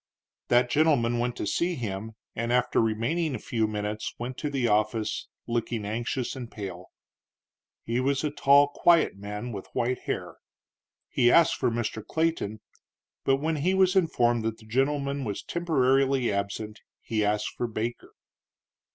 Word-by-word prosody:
That 120 0 +3
gentleman 140 -6 +3
went 120 0 -1
to - - -3
see 170 - 0
him, 110 -3 -4 0.2
and 115 +1 -2
after 125 0 +2
remaining 125 +8 0
a - - -2
few 110 0 -1
minutes 105 0 -3
went 125 +2 -5
to 150 - -2
the 135 -4 0
office, 105 0 0 0.2
looking 115 -2 -2
anxious 120 +5 -2
and 125 -3 -7
pale. 95 -5 -7 1.0
He 120 +2 -1
was 135 +2 +1
a 150 - 0
tall, 145 0 +5
quiet 170 -1 +3
man, 105 +4 -6
with 100 -3 -7
white 125 +1 0
hair. - - -3 0.7
He 120 0 +3
asked 170 0 +6
for 125 - 0
Mr. 115 -2 -3
Clayton, 160 -10 -1 0.6
but 135 - +4
when 155 +3 -1
he 180 +6 +1
was 190 0 +4
informed 120 -10 +2
that 110 0 -2
that 110 - -17
gentleman 140 +3 0
was 105 -5 -4
temporarily 135 -7 +2
absent 100 +2 -3 0.2
he 110 -2 -1
asked 105 +1 0
for 120 - -2
Baker. 115 +1 -5
120 Hz, 155 wpm, -27 LUFS, 110-140 Hz, 1.0 s, asked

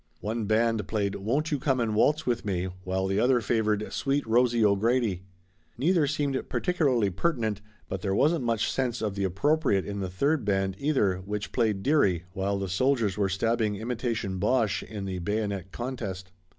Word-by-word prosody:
One 110 +1 -2
band 110 -1 +1
played 100 -3 -1
"Won't 135 +11 -1
You 145 - 0
Come 135 -2 +1
and 115 -2 0
Waltz 150 +8 +2
With 120 -2 0
Me?" 95 -2 -2 0.2
while 95 +1 -1
the 95 +1 0
other 125 +1 +4
favored 110 -2 0
"Sweet 140 +1 0
Rosie 120 0 +3
O'Grady." 105 -1 +2 0.6
Neither 160 +3 +2
seemed 140 -2 -1
particularly 135 - +1
pertinent, 110 - -1 0.3
but 95 -1 -4
there 95 -2 -1
wasn't 155 +3 +2
much 115 -2 0
sense 125 -3 -1
of 105 -2 -1
the 100 0 -1
appropriate 100 - +1
in 100 0 -4
the 95 -2 -3
third 140 - +1
band, 95 -2 0
either, 130 -11 +1
which 105 +3 -5
played 110 -5 0
"Dearie," 100 - +3
while 100 +1 -1
the 100 0 -3
soldiers 110 +1 +1
were 100 -1 +1
stabbing 110 +2 0
imitation 110 -3 -3
Boches 105 -1 +1
in 105 -3 -5
the 95 -1 -3
bayonet 100 0 -2
contest. 100 -7 -5
110 Hz, 175 wpm, -27 LUFS, 95-130 Hz, 0.6 s, other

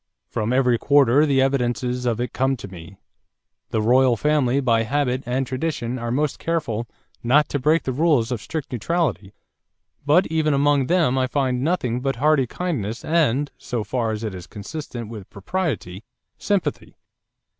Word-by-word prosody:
From 110 +2 -1
every 125 -2 +3
quarter 145 +1 +4
the 135 -2 +3
evidences 125 -1 -1
of 115 -1 0
it 125 - -3
come 135 0 +1
to 100 - -8
me. 90 0 -12 0.7
The 110 - -1
royal 125 +1 +4
family 140 -1 +2
by 115 -4 +2
habit 130 +1 0
and 130 +2 0
tradition 130 -3 -3
are 120 0 -4
most 145 +4 -1
careful 120 -9 -2 0.3
not 140 +6 +3
to 145 - -1
break 155 +5 +2
the 130 - -2
rules 135 -4 +2
of 120 -4 -2
strict 155 -3 -5
neutrality, 125 - -2 0.7
but 150 +6 +4
even 155 -2 +1
among 140 -1 +2
them 165 -8 +2
I 130 - +1
find 130 -2 0
nothing 130 -6 0
but 135 +1 -1
hearty 140 0 +2
kindness 115 - -3
and 145 -4 +1
so 120 -4 -3
far 120 0 -1
as 110 0 -3
is 95 -5 -6
consistent 120 +1 -7
with 105 -4 -9
propriety 100 - -3 0.4
sympathy. 200 -3 -2
130 Hz, 160 wpm, -22 LUFS, 115-150 Hz, 0.7 s, quarter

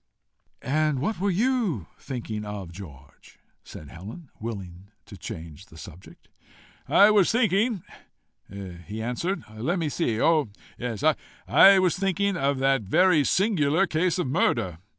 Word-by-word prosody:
"And 150 +1 +1
what 175 +11 -2
were 200 +2 0
you 205 - 0
thinking 115 -5 -5
of, 105 -4 -7
George?" 75 -7 -14 0.3
said 75 - -11
Helen, 110 - -11
willing 95 -5 -7 0.2
to - - -12
change 80 +4 -9
the 80 - -16
subject. 85 +3 -13 0.6
"I 205 +1 +6
was 205 -4 +4
thinking," 220 -3 +1 0.7
he 95 +1 -8
answered, 165 - -3
"let 130 - -2
me 160 -3 -1
see! 120 -8 -1
oh! 155 -6 +2 0.3
yes 120 +1 -4 0.4
I 195 0 +7
was 185 -3 +2
thinking 195 +1 0
of 140 -4 0
that 135 -1 +2
very 160 - +3
singular 185 -2 +2
case 180 +1 0
of 180 - -1
murder. 115 - 0
140 Hz, 135 wpm, -25 LUFS, -, 0.7 s, I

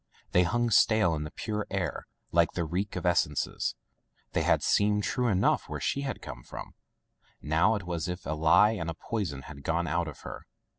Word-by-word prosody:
They 90 - +5
hung 120 +6 +1
stale 110 -6 +4
in 75 -1 -2
the - - -5
pure 105 +4 -4
air 95 -4 -3 0.2
like 85 -1 +3
the 85 - -1
reek 95 +5 -2
of 90 - -4
essences. 85 -5 +1 0.6
They - - +1
had - - +2
seemed 105 0 +3
true 125 +3 0
enough 95 -4 +2
where - - -4
she 140 - -1
came 135 -2 -5
from. - - -9 0.7
Now 85 +9 +2
it 100 - -4
was 85 -1 -3
as - - 0
if 90 - -12
a 75 - -1
lie 85 +7 +5
and 85 -7 -3
a 80 - -4
poison 80 -11 -3
had 70 -1 -10
gone 85 +4 0
out 85 -1 0
of 75 - -9
her. - - -8
90 Hz, 200 wpm, -29 LUFS, 80-105 Hz, 0.7 s, They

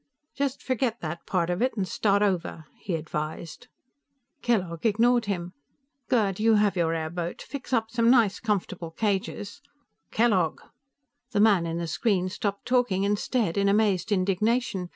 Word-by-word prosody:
"Just 280 -1 -2
forget 255 -2 -1
that 160 +1 -6
part 180 -2 0
of 175 - -2
it 255 -1 0
and 190 -2 -1
start 200 +3 +2
over," 180 -5 -1
he 185 - -3
advised. 155 +6 -5 0.7
Kellogg 180 -9 -1
ignored 235 +2 +3
him. 180 -3 -3 0.6
"Gerd, 210 -7 +1
you 225 +1 +4
have 205 -1 +2
your 165 -2 +1
airboat; 165 +2 -4
fix 275 -1 -8
up 225 -3 +1
some 230 0 +2
nice 230 -6 +4
comfortable 185 -6 -2
cages 200 +5 -3 0.2
" - - -52
"Kellogg!" 200 -8 +2 0.7
The 205 - +1
man 200 -6 +4
in 165 0 -3
the 170 - -2
screen 185 +2 0
stopped 200 +1 -3
talking 245 -7 +1
and 205 0 +1
stared 215 -9 0
in 200 0 +3
amazed 205 0 +2
indignation. 200 0 0
200 Hz, 155 wpm, -26 LUFS, 175-225 Hz, 0.7 s, you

